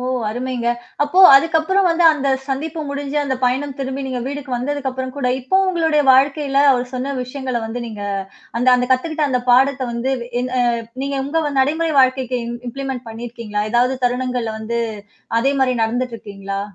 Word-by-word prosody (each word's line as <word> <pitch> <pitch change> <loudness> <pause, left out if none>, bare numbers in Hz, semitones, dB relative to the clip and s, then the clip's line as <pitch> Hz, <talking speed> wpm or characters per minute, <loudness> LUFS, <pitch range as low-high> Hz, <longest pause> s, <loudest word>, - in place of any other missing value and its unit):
ஓ! - - -5 0.3
அருமைங்க. 245 +1 -3 0.4
அப்போ 295 +6 +2 0.2
அதுக்கு 325 +4 +2
அப்புறம் 380 +4 +2
வந்து 340 0 +2
அந்த 280 -2 -2 0.2
சந்திப்பு 310 +4 -3
முடிஞ்சு 280 +1 -4
அந்த 275 -2 -1
பயணம் 265 +2 0
திரும்பி 270 0 -3
நீங்க 255 -2 -3
வீடுக்கு 280 0 -6
வந்ததுக்கு 275 +1 -2
அப்புறம் 260 +1 -5
கூட, 275 -3 -1
இப்பவும் 380 +9 +2
உங்களுடைய 320 -4 +2
வாழ்க்கையில 275 +1 +3
அவர் 250 -1 -1
சொன்ன 270 +2 -3
விஷயங்கள 255 -1 -4
வந்து 235 +2 -5
நீங்க 215 -3 -7 0.6
அந்த 245 - +2
அந்த 250 0 +1
கத்துக்கிட்ட 310 +4 0
அந்த 250 -1 0
பாடத்த 265 +2 +4
வந்து 240 +3 -1 0.3
என் 250 0 -3 0.5
நீங்க 280 0 -2
உங்க 300 +1 -1
நடைமுறை 315 +4 +1
வாழ்க்கைக்கு 255 -1 +1 0.3
இம்ப்ளிமெண்ட் 265 -1 -5
பண்ணிருக்கீங்களா? 225 -2 -5
ஏதாவது 250 +2 +2
தருணங்கள்ல 245 -2 -1
வந்து 235 +2 -3 0.6
அதே 275 +4 +2
மாதிரி 255 -1 +2
நடந்துட்டுருக்கீங்களா? 220 -4 -3
260 Hz, 160 wpm, -19 LUFS, 245-285 Hz, 0.6 s, பாடத்த